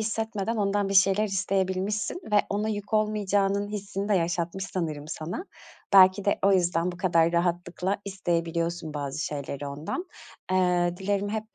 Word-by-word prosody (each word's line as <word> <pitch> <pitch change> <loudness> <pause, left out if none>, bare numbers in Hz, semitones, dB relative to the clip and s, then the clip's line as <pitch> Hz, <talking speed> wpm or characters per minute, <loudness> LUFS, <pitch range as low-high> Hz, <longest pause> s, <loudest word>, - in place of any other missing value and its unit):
hissetmeden 220 0 -2
ondan 200 -1 +1
bir 195 - -2
şeyler 195 +2 +5
isteyebilmişsin 195 - -1
ve - - +5
ona 210 +2 -1
yük 205 +1 -3
olmayacağının 205 -1 +1
hissini 200 -1 -4
de 210 - +3
yaşatmış 175 +1 -1
sanırım 155 -4 -4
sana. 165 - -5 0.5
Belki 190 0 +7
de 200 - +2
o 195 - +5
yüzden 175 -1 +1
bu - - -10
kadar 170 -2 +2
rahatlıkla 175 +2 0
isteyebiliyorsun 170 -4 -2
bazı 140 0 -4
şeyleri 140 -1 -5
ondan. 150 - -4 0.5
Eee, 180 -1 +2
dilerim 200 +1 -1
hep 220 +1 -5
190 Hz, 145 wpm, -27 LUFS, 170-205 Hz, 0.5 s, Belki